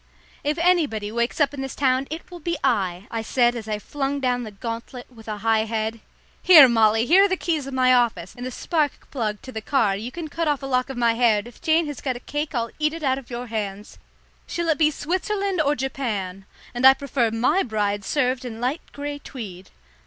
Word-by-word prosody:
"If 295 +2 0
anybody 310 -12 +1
wakes 235 +5 -1
up 290 -2 +3
this 270 -2 -5
town 265 -1 +1
it 320 +4 -7
will 350 - -8
be 340 +1 -2
I," 195 -8 0
I 230 - -2
said 240 +2 +2
as 225 -2 -6
I 215 -1 -1
flung 280 +6 -3
down 250 -2 0
the 225 - -6
gauntlet 230 +4 -6
with 225 -2 -15
a 215 -1 -3
high 220 +1 +2
head. 220 0 -2 0.4
"Here, 315 -7 +9
Molly, 225 -1 +3
here 370 +8 +6
are - - +1
the 375 - 0
keys 315 -6 -1
of 270 - -5
my 255 0 +4
office, 235 -8 +1
and 245 - -8
the 255 - -3
spark 300 +2 -2
plug 215 -6 -3
to 260 - -8
the 220 - -5
car; 215 -5 +1
you 225 +5 -5
can 335 +2 -6
cut 330 +2 -2
off 290 -2 0
a - - -3
lock 255 -1 0
of 265 - -6
my 235 -1 +3
hair, 230 -2 +3
and 205 - -4
if 240 - -15
Jane 325 0 +3
has 290 -3 -6
got 260 -3 -2
a - - -6
cake 295 +3 -4
I'll 230 -1 -1
eat 305 0 +1
it 330 - -8
out 265 -1 +1
of 260 - -16
your 240 0 -5
hands. 210 -3 -5 0.5
Shall 340 -1 -2
it 315 - +2
be 305 -1 +5
Switzerland 375 +4 -1
or 290 -1 +2
Japan? 210 -8 -3 0.3
And 245 +1 -4
I 265 0 +9
prefer 270 -4 0
my 230 - +2
bride 205 - -1
served 255 +1 0
in 230 -3 -7
light 255 +7 -1
grey 285 0 -5
tweed." 195 -10 -9
255 Hz, 230 wpm, -23 LUFS, 225-290 Hz, 0.5 s, Here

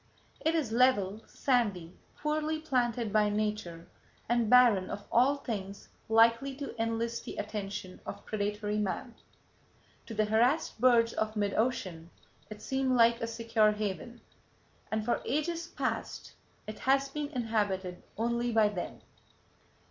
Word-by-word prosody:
It 320 +1 +2
is 290 -9 0
level, 225 -4 +3
sandy, 205 -10 0 0.2
poorly 310 +1 -1
planted 240 -7 0
by 210 -1 +4
nature, 205 -5 -2 0.4
and 235 -2 +1
barren 240 -6 +6
of 205 - -6
all 255 +4 +4
things 200 -7 -6 0.2
likely 230 +4 +4
to 280 -2 -6
enlist 230 +1 -2
the - - -7
attention 200 -3 -5
of - - -8
predatory 210 0 -2
man. 210 +4 -3 0.9
To 225 - -7
the 215 0 +2
harassed 230 +4 +1
birds 235 -2 +5
of 215 0 -2
mid 205 -1 0
ocean, 185 -8 -1 0.4
it 215 0 -9
seemed 265 -1 0
like 235 -1 +4
a 230 - -1
secure 230 -2 +2
haven, 210 +3 -4 0.7
and 220 0 -2
for 240 - 0
ages 335 +3 -2
past - - -4 0.3
it 215 - -7
has 275 +1 +2
been 295 +1 -3
inhabited 210 - -2 0.2
only 235 +2 0
by 220 -2 +4
them. 185 -4 -6
225 Hz, 135 wpm, -30 LUFS, 210-250 Hz, 0.9 s, barren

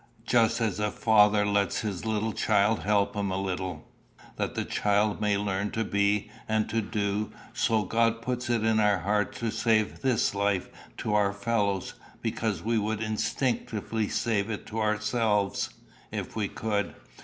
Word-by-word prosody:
Just 115 -2 +3
as 105 -4 0
a 105 0 +1
father 105 -2 +4
lets 100 -1 +1
his 105 -2 -4
little 110 0 0
child 105 0 +2
help 100 0 +1
him 100 -1 -1
a 95 - -1
little, 95 -4 -4 0.5
that - - -2
the - - -1
child 105 +1 +1
may 105 -1 +2
learn 100 0 -1
to 115 - 0
be 100 0 +1 0.2
and 110 0 +1
to 115 - +1
do, 105 0 -2 0.2
so 115 -3 +2
God 115 +3 +1
puts 125 0 -2
it 115 -2 +1
in 110 0 +3
our 105 -2 +4
hearts 105 +3 0
to 115 -1 0
save 110 -2 +1
this 130 -7 +2
life 100 -2 0 0.3
to 105 - -2
our 105 -1 +3
fellows, 100 -2 -1 0.3
because 105 -7 -1
we 115 +1 +1
would 110 +1 -1
instinctively 110 0 -1
save 110 -3 0
it 105 - -4
to 110 +1 -4
ourselves, 105 -1 +1 0.4
if - - -5
we 105 -2 0
could. 105 -1 -2
105 Hz, 165 wpm, -28 LUFS, 100-110 Hz, 0.5 s, father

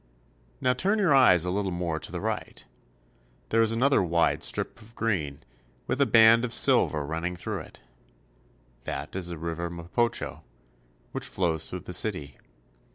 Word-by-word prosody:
Now 125 - +2
turn 195 +11 +1
your 190 -8 +3
eyes 90 -11 +5
a 90 - -1
little 100 0 -1
more 85 -3 -2
to - - -8
the - - -4
right. - - -4 0.8
There 115 - +3
is 115 -1 +3
another 130 +5 +3
wide 85 -2 +1
strip - - -3
of 115 +2 -11
green, 80 -12 -2 0.4
with 135 - -1
a 140 - +4
band 115 +1 +6
of 120 -2 -2
silver 75 -1 +3
run 80 +3 -4
ning 90 +1 -3
through 90 - -4
it. - - -13 1.0
That - - -5
is 95 -2 -2
the 85 -1 -5
river 85 +1 -4
Mapocho, 85 +8 -2 0.7
which - - -4
flows 80 -4 -1
through 90 - -6
the 90 - -7
city. 90 - -1
90 Hz, 165 wpm, -27 LUFS, 85-115 Hz, 1.0 s, band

